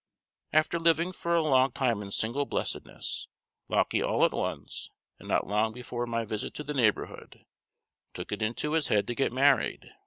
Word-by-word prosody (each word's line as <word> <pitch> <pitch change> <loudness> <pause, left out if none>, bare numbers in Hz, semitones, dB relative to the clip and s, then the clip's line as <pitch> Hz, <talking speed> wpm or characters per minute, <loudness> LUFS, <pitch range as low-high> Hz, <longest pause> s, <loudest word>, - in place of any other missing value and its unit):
After 155 +2 +2
living 165 +2 +3
for 170 -1 -1
a 165 - +3
long 130 -4 +4
time 120 -6 +1
in 100 - -7
single 120 +8 0
blessedness, - - -2 0.4
Lauckie - - +2
all - - +3
at - - +2
once, - - -3 0.3
and - - -12
not - - +1
long 105 +2 +1
before 120 0 -4
my 115 -1 -1
visit 110 -1 -4
to 150 - -4
the 150 +1 -4
neighborhood, 115 -7 -1 0.7
took 90 - -6
it 105 - -3
into 115 +7 -1
his 160 -2 +1
head 105 -1 +2
to 120 - -2
get 135 0 0
married. 135 +2 +2
125 Hz, 180 wpm, -29 LUFS, 110-150 Hz, 0.7 s, long